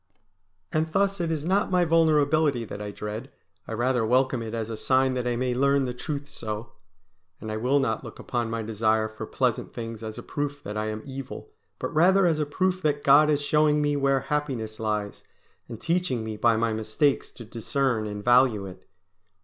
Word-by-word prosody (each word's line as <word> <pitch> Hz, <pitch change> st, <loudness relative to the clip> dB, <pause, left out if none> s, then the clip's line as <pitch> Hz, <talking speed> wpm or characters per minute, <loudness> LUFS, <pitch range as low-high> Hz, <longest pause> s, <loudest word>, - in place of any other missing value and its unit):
And 155 Hz, +1 st, 0 dB
thus 200 Hz, +1 st, +1 dB
it 170 Hz, -, -1 dB
is 155 Hz, -2 st, -2 dB
not 195 Hz, +4 st, +2 dB
my 180 Hz, -2 st, +3 dB
vulnerability 155 Hz, -5 st, +3 dB
that 105 Hz, 0 st, -7 dB
I 105 Hz, -, -4 dB
dread; 105 Hz, +5 st, -6 dB, 0.4 s
I -, -, -5 dB
rather 120 Hz, +1 st, +1 dB
welcome 130 Hz, +2 st, +2 dB
it 115 Hz, 0 st, -5 dB
as 115 Hz, 0 st, -3 dB
a -, -, -3 dB
sign 130 Hz, +3 st, +2 dB
that 125 Hz, -1 st, -2 dB
I 120 Hz, -, 0 dB
may 125 Hz, +1 st, 0 dB
learn 140 Hz, +2 st, +2 dB
the 125 Hz, -, -3 dB
truth 140 Hz, +3 st, -5 dB
so. 110 Hz, -3 st, -6 dB, 0.7 s
And 110 Hz, -, -6 dB
I 110 Hz, -, -2 dB
will 130 Hz, +6 st, +2 dB
not 110 Hz, -5 st, -1 dB
look -, -, -9 dB
upon 120 Hz, -2 st, -2 dB
my 115 Hz, 0 st, -3 dB
desire 110 Hz, 0 st, +1 dB
for 110 Hz, 0 st, -8 dB
pleasant -, -, -1 dB
things 115 Hz, -1 st, -6 dB
as 110 Hz, -1 st, -6 dB
a -, -, -7 dB
proof 145 Hz, 0 st, -4 dB
that 105 Hz, -, -6 dB
I 105 Hz, 0 st, -1 dB
am 110 Hz, 0 st, -4 dB
evil, 135 Hz, -1 st, -8 dB, 0.3 s
but -, -, -4 dB
rather 185 Hz, +4 st, +5 dB
as 160 Hz, -3 st, +2 dB
a 150 Hz, -, 0 dB
proof 185 Hz, +4 st, 0 dB
that 145 Hz, -3 st, 0 dB
God 145 Hz, +2 st, +6 dB
is 145 Hz, -1 st, +1 dB
showing 150 Hz, 0 st, +3 dB
me 145 Hz, 0 st, +1 dB
where 135 Hz, -1 st, +2 dB
happiness 135 Hz, -7 st, -3 dB
lies, 105 Hz, -2 st, -2 dB, 0.5 s
and -, -, -7 dB
teaching 165 Hz, -9 st, 0 dB
me 110 Hz, -1 st, -4 dB
by 115 Hz, +1 st, +3 dB
my 115 Hz, 0 st, +1 dB
mistakes 110 Hz, +7 st, 0 dB
to 120 Hz, -, -10 dB
discern 115 Hz, 0 st, -1 dB
and 105 Hz, 0 st, -6 dB
value 120 Hz, -4 st, +4 dB
it. 95 Hz, -1 st, -11 dB
130 Hz, 205 wpm, -26 LUFS, 110-150 Hz, 0.7 s, God